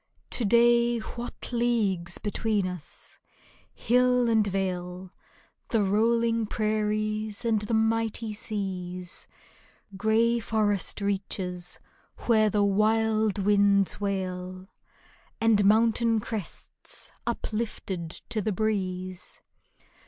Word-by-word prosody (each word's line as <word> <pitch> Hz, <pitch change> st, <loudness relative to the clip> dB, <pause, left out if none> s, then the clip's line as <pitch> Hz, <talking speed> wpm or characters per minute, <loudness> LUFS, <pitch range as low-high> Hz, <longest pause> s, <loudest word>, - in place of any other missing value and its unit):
To 245 Hz, -, +3 dB
day 235 Hz, +2 st, +4 dB
what 240 Hz, +3 st, -7 dB
leagues 210 Hz, -8 st, +1 dB
between 210 Hz, -1 st, -1 dB
us! 180 Hz, -4 st, -6 dB, 0.5 s
Hill 250 Hz, 0 st, +2 dB
and 220 Hz, -2 st, +3 dB
vale, 185 Hz, -1 st, -3 dB, 0.5 s
The 225 Hz, -3 st, +1 dB
rolling 230 Hz, +2 st, +2 dB
prairies 215 Hz, 0 st, -1 dB
and 220 Hz, -2 st, +2 dB
the 210 Hz, +2 st, -1 dB
mighty 225 Hz, 0 st, 0 dB
seas; 185 Hz, -4 st, -5 dB, 0.7 s
Gray 225 Hz, +4 st, +2 dB
forest 210 Hz, -3 st, 0 dB
reaches 185 Hz, -3 st, -2 dB, 0.5 s
where 220 Hz, -2 st, +4 dB
the 205 Hz, 0 st, +2 dB
wild 215 Hz, +1 st, +2 dB
winds 200 Hz, 0 st, +3 dB
wail. 185 Hz, -1 st, -3 dB, 0.7 s
And 220 Hz, -2 st, +4 dB
mountain 225 Hz, +2 st, +3 dB
crests 210 Hz, -3 st, -4 dB, 0.2 s
uplifted 205 Hz, -6 st, -3 dB, 0.2 s
to 225 Hz, -2 st, 0 dB
the 215 Hz, -, -1 dB
breeze 185 Hz, -3 st, -3 dB
215 Hz, 95 wpm, -27 LUFS, 190-225 Hz, 0.7 s, day